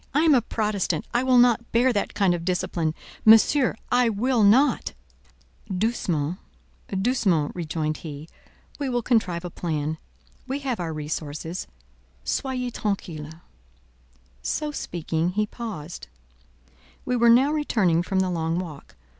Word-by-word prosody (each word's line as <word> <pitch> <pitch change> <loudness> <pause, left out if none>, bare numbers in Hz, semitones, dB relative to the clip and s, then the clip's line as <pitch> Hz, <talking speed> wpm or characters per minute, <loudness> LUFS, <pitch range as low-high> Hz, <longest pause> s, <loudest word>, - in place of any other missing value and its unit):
I 300 - +5
am 320 -2 +6
a 255 - +5
Protestant: 210 -7 -1
I 240 - +3
will 260 -1 +4
not 240 -1 +4
bear 245 +2 +3
that 205 - -2
kind 195 -3 +3
of 170 -1 -3
discipline: 170 -3 -1 0.3
Monsieur, 225 +4 +6 0.2
I 245 -1 +4
will 235 +3 +1
not." 235 +8 +4 0.8
"Doucement—doucement," 180 - -1
rejoined 155 -3 -2
he; 150 -1 -8 0.5
"we 280 -2 -1
will 245 -1 -1
contrive 180 -8 +1
a 175 - -5
plan; 155 -2 -3 0.5
we 265 +2 -2
have 260 -6 -2
our 170 -2 -3
resources: 155 +2 -5 0.6
soyez 255 -2 -2
tranquille." 160 -6 -4 1.0
So 300 - -2
speaking, 170 - -2
he 215 +2 +1
paused. 200 -8 -7 1.0
We 250 - 0
were 235 -1 +4
now 260 +5 +6
returning 215 - +2
from 190 +1 0
the 185 -1 0
long 165 -1 -1
walk. 165 -6 -7
190 Hz, 130 wpm, -25 LUFS, 160-240 Hz, 1.0 s, am